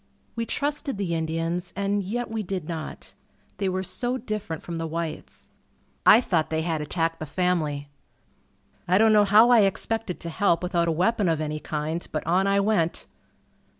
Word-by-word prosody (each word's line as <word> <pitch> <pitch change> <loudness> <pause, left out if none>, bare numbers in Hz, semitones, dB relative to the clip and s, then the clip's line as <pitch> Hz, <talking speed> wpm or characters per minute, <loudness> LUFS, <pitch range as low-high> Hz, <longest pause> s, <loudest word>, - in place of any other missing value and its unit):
We 230 -1 -3
trusted 285 -3 -2
the 190 -4 -2
Indians 165 +2 -2
and 200 +1 0
yet 225 +5 -3
we 225 -1 -2
did 185 -5 -4
not. 160 -2 -6 0.5
They 195 -2 0
were 185 0 -2
so 240 +8 -2
different 215 -9 -5
from 170 -1 -5
the 165 0 -3
whites. 165 -1 -6 0.6
I 225 - +9
thought 165 -9 0
they 160 0 -1
had 160 -2 -1
attacked 165 +2 -1
the 155 - -5
family. 155 -5 -1 1.0
I 180 +1 +4
don't 220 +1 +5
know 210 -1 +6
how 215 +4 +6
I 240 - +7
expected 205 0 0
to 170 - -4
help 170 -1 +1
without 175 -1 +1
a - - +2
weapon 185 +4 +1
of 160 -2 +1
any 155 0 -3
kind, 155 +3 -3
but 155 - -3
on 185 +4 +2
I 200 0 +3
went. 200 -5 0
180 Hz, 180 wpm, -25 LUFS, 165-205 Hz, 1.0 s, I